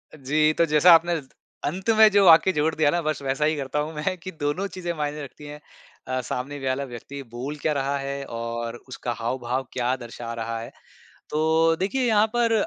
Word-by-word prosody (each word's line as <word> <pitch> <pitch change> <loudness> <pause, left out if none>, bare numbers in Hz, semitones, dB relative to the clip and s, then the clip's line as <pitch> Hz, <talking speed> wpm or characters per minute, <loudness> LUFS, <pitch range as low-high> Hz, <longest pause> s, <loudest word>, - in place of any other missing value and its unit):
जी, 155 +2 +2
तो 170 - +3
जैसा 155 +3 +5
आपने 165 0 +4
त 135 - -20 0.4
अंत 185 +8 -3
में 220 0 +8
जो 200 -1 +5
वाक्य 170 +2 +7
जोड़ 155 0 +1
दिया 155 -1 +3
ना, 175 - 0
बस 155 -3 -2
वैसा 135 +2 0
ही 155 +1 +2
करता 140 +1 -2
हूँ 150 +2 -3
मैं, 175 +5 -2
कि 185 +2 -8
दोनों 150 +4 -2
चीज़ें 180 -3 -5
मायने 150 0 -3
रखती 140 +2 -11
हैं। 145 0 -8 0.5
अ, 130 0 -1
सामने 130 +3 -4
वाला 130 +2 0
व्यक्ति 135 +3 -8
बोल 130 +5 -5
क्या 155 - +1
रहा 140 0 -1
है 140 0 -4
और 115 0 -4
उसका 125 -1 -5
हाव-भाव 125 +2 -2
क्या 125 0 0
दर्शा 120 -1 -7
रहा 115 0 -4
है। 115 - -7 0.6
तो 160 +1 +3
देखिए, 200 +8 -1
यहाँ 215 -2 +4
पर, 235 -1 +3
150 Hz, 205 wpm, -24 LUFS, 130-165 Hz, 0.6 s, में